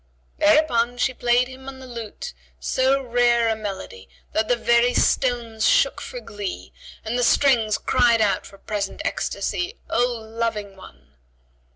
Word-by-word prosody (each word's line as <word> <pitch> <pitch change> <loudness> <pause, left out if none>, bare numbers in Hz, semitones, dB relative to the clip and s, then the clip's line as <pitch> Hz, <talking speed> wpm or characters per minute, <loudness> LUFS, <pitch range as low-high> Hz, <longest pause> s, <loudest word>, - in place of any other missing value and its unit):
Thereupon 245 -1 +3
she 255 - +1
played 245 0 +2
him 260 +1 -10
on 270 - -10
the 260 - -11
lute 240 - -7 0.3
so 265 +1 +2
rare 240 -1 +3
a 220 - +1
melody 195 - -7 0.2
that 215 0 0
the 245 - +3
very 235 +1 +3
stones 235 -4 +1
shook - - +3
for - - -6
glee, 205 - -7 0.3
and 235 +3 -1
the - - +2
strings 230 -4 +3
cried 240 -1 +3
out 210 -2 +1
for 195 - -15
present 205 0 -4
ecstasy, 360 +6 -2
"O 245 +1 +3
Loving 225 -3 -4
One!" 70 - -16
235 Hz, 150 wpm, -23 LUFS, 215-250 Hz, 0.3 s, Thereupon